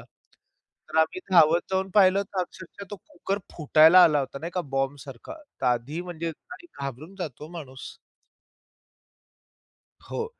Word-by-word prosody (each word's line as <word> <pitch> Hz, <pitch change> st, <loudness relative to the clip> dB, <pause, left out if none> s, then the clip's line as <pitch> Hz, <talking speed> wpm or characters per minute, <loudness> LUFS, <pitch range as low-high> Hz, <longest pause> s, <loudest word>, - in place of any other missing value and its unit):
तर 160 Hz, -, -11 dB
आम्ही 160 Hz, -, +1 dB
धावत 170 Hz, -1 st, +6 dB
जाऊन 190 Hz, 0 st, -1 dB
पाहिलं, 195 Hz, -1 st, +5 dB
तर 195 Hz, -1 st, -4 dB
अक्षरशः 185 Hz, +2 st, -8 dB
तो 205 Hz, -, -6 dB
कुकर 195 Hz, 0 st, -5 dB, 0.2 s
फुटायला 160 Hz, +3 st, +7 dB
आला 150 Hz, -2 st, +3 dB
होता 140 Hz, 0 st, -5 dB
नाही 165 Hz, +4 st, -6 dB
का 180 Hz, -, 0 dB, 0.2 s
बॉम्बसारखा. 135 Hz, -2 st, -4 dB, 0.3 s
तर 130 Hz, -, -1 dB
आधी 125 Hz, +6 st, -1 dB
म्हणजे 170 Hz, -2 st, -5 dB, 0.5 s
घाबरून 140 Hz, +6 st, -7 dB
जातो 155 Hz, -3 st, -6 dB
माणूस. 135 Hz, -6 st, -9 dB, 2.1 s
हो. 460 Hz, -, -3 dB
160 Hz, 125 wpm, -26 LUFS, 140-185 Hz, 2.1 s, फुटायला